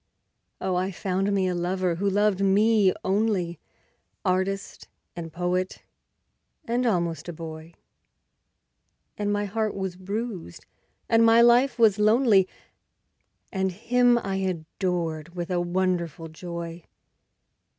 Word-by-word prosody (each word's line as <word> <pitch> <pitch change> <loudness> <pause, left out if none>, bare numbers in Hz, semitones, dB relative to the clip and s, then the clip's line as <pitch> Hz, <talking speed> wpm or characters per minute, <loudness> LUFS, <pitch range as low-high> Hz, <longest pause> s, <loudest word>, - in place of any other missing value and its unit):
Oh, 185 - -1
I 185 +1 0
found 195 +1 -1
me 195 -2 +1
a 180 - 0
lover 180 +1 0
who 200 +4 0
loved 205 0 +2
me 205 0 +4
only, 190 -4 0 0.7
Artist 190 +1 -1 0.3
and 165 -2 -6
poet, 180 +2 -2 0.8
and 245 0 0
almost 170 -5 -1
a - - -5
boy. 160 0 -9 1.4
And 205 0 -1
my 205 0 0
heart 215 +1 -2
was 190 -2 -3
bruised, 195 - -5 0.4
and 225 0 +4
my 230 +1 +6
life 245 +3 +4
was 220 -3 +4
lonely, 215 -3 +4 1.0
And 190 -1 0
him 240 +5 +3
I 195 -4 -2
adored 170 -2 -3
with 175 +1 -4
a 175 -1 +1
wonderful 175 -3 -1
joy. 170 0 -7
190 Hz, 120 wpm, -26 LUFS, 175-210 Hz, 1.4 s, my